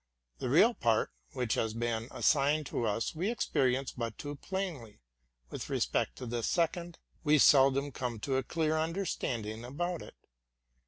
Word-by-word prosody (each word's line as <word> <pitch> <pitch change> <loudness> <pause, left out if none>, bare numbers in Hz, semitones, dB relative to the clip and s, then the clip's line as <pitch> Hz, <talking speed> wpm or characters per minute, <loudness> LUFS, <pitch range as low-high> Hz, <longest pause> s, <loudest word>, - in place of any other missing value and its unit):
The - - -2
real 195 - +6
part 115 - +1 0.2
which 125 -3 -1
has 110 -1 -1
been 115 -1 -1
as - - -4
signed 150 +1 +3
to 120 -3 -2
us 110 +2 -1
we 175 +6 -1
experience 135 - +1
but 115 -3 -4
too 145 0 -5
plainly; 160 - -5 0.5
with - - -6
respect - - 0
to 125 - -7
the 120 0 -2
second, 170 +4 0 0.3
we 150 -1 +5
seldom 140 0 +5
come 125 -3 -4
to 135 +2 0
a - - +2
clear 160 +3 0
understanding 125 - -2
about 170 +7 -3
it. - - -11
135 Hz, 160 wpm, -31 LUFS, 120-165 Hz, 0.5 s, real